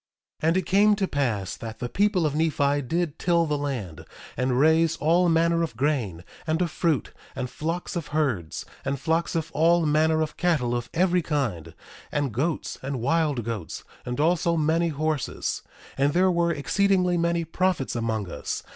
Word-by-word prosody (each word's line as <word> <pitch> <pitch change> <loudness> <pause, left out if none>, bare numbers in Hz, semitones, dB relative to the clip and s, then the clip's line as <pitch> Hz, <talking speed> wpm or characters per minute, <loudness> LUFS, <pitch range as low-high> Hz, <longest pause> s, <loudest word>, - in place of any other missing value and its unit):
1:21 155 - +1
And 165 +3 +3
it 185 - 0
came 205 +4 +4
to 195 -2 -1
pass 115 - -1
that 110 -1 -8
the 120 - -3
people 195 - +1
of 150 - 0
Nephi 145 -2 +1
did 160 +3 -2
till 170 -1 +2
the 150 -2 0
land, 130 - -4 0.3
and 125 0 0
raise 160 +2 +4
all 170 +3 +3
manner 165 +1 +3
of 155 -9 -3
grain, 120 - -1 0.2
and 160 +1 +1
of 175 -3 0
fruit, 160 -4 0 0.2
and 130 -2 -4
flocks 165 +7 -3
of 165 -3 -3
herds, 130 - -1 0.2
and 140 -1 -2
flocks 165 +4 0
of 165 0 -2
all 170 +2 +3
manner 155 +1 +3
of 155 - -6
cattle 155 -9 +1
of 120 0 -4
every 180 +1 +3
kind, 135 - -2 0.4
and 145 -5 -1
goats, 150 +7 -2
and 135 -1 -3
wild 145 -1 +1
goats, 105 -7 -5 0.2
and 125 +1 -4
also 170 +1 +2
many 160 +2 +2
horses. 155 -2 -2 0.4
1:22 - - +3
And 145 +1 +3
there 185 +1 +4
were 170 -1 +2
exceedingly 185 +3 +2
many 170 0 +1
prophets 175 -5 0
among 110 -3 -1
us. - - -4
155 Hz, 180 wpm, -25 LUFS, 130-170 Hz, 0.4 s, came